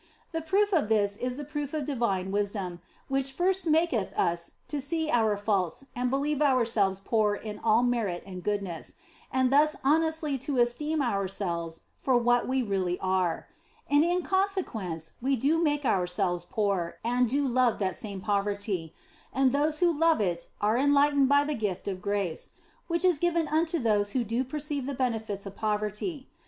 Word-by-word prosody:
The 325 -1 -2
proof 400 +5 +1
of 300 - +2
this 205 -2 +2
is 250 +3 -3
the 295 - -5
proof 295 0 -4
of 300 -3 -2
divine 200 -9 -1
wisdom, 195 -4 -2 0.3
which 270 0 0
first 370 +3 +1
maketh 310 - +2
us 170 0 0
to 295 -2 -3
see 315 +3 -1
our 220 -3 +3
faults 200 +2 -1
and 250 0 0
believe 285 +2 0
ourselves 230 -8 +2
poor 210 0 +1
in 210 0 -7
all 225 +1 +3
merit 225 -8 0
and 185 -2 -8
goodness, 195 -4 -3 0.4
and 260 0 +2
thus 300 +2 +4
honestly 315 0 +1
to 270 +1 -3
esteem 285 +6 +1
ourselves 190 -6 -2 0.2
for 260 -2 +3
what 240 0 +2
we 260 0 +1
really 190 -4 -1
are. 185 -3 0 0.4
And 290 +1 +5
in 350 +1 +1
consequence 325 - -2
we 270 +2 +2
do 290 +7 +2
make 295 -3 +1
ourselves 180 -3 0
poor 200 -5 -1
and 245 0 +2
do 280 +3 +1
love 250 -2 +2
that 190 -3 -1
same 200 -3 -6
poverty, 200 -4 -2 0.4
and 265 -1 +3
those 300 +4 0
who 350 -1 +5
love 325 +1 +3
it 175 -4 -1
are 215 +4 +2
enlightened 285 0 +4
by 285 0 +5
the 300 +1 -2
gift 205 -8 -3
of 190 -2 -3
grace 200 -4 -2 0.4
(which 340 +1 +1
is 355 -5 +3
given 340 -1 +1
unto 320 +2 +1
those 210 -6 +1
who 255 - +1
do 230 +3 -1
perceive 285 0 -4
the 280 - -3
benefits 220 -6 -2
of 195 0 -8
poverty). 215 - -2
245 Hz, 170 wpm, -28 LUFS, 200-290 Hz, 0.4 s, And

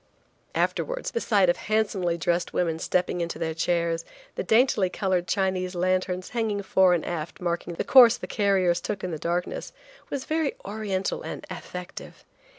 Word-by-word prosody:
Afterwards, - - -1
the 470 - -2
sight 200 -5 +3
of 175 - +3
handsomely 200 -5 0
dressed 170 +2 0
women 165 -2 0
stepping 180 0 0
into 170 0 -3
their 160 -1 -2
chairs, 165 0 0 0.3
the - - -3
daintily 220 -2 +3
colored 185 -2 -1
Chinese 185 0 0
lanterns, 185 0 0
hanging 220 -4 -1
fore 190 -1 +4
and 165 - -3
aft, 165 -2 -4
marking 170 -1 -2
the - - -2
course 245 -3 +7
the - - -6
carriers 190 -5 +2
took 205 0 -4
in 180 - -2
the 160 - -4
darkness, 175 +2 -2 0.4
was 275 -2 -4
very 315 -2 0
oriental 200 -2 -2
and - - -6
affective. 180 0 -8
185 Hz, 160 wpm, -26 LUFS, 175-205 Hz, 0.4 s, course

